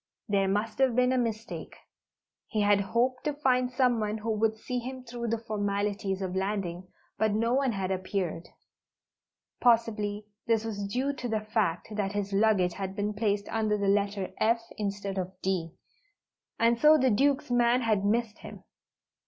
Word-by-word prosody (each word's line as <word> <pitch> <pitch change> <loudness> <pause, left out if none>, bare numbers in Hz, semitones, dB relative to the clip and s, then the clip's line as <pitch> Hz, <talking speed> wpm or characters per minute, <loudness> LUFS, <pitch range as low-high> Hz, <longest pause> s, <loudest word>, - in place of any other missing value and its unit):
There 200 -2 +2
must 210 +4 -1
have 260 -3 +3
been 250 0 +3
a 260 - +2
mistake. 225 -2 -4 0.7
He 215 - -1
had 205 -1 +4
hoped 245 +5 0
to 300 - 0
find 255 -3 +2
someone 240 -5 +1
who 220 +1 -3
would 220 0 +1
see 250 +3 -3
him 255 +1 -7
through 235 -1 -5
the 230 +1 0
formalities 205 -3 -2
of 185 -1 -3
landing, 190 -2 -2 0.3
but 215 -1 +2
no 230 +3 +1
one 265 -2 +2
had 190 -2 -2
appeared. 185 -3 -3 1.1
Possibly 215 -3 +2 0.2
this 225 -1 +2
was 205 -3 -3
due 260 +7 -1
to 250 -3 -5
the 220 -1 0
fact 215 -6 -1
that 205 -1 -1
his 205 -1 -2
luggage 195 -4 +3
had 195 0 -5
been 210 +1 -1
placed 205 -1 0
under 215 -1 0
the 200 -1 -1
Letter 200 -1 +1
F 230 +1 +3
instead 200 -2 -3
of 185 0 -5
D, 175 -4 -1 0.8
and 230 +1 +3
so 305 +2 +7
the 260 -3 +3
Duke's 270 +4 +2
man 240 +1 +3
had 215 -4 +1
missed 220 +1 0
him. - - -10
215 Hz, 170 wpm, -29 LUFS, 200-235 Hz, 1.1 s, so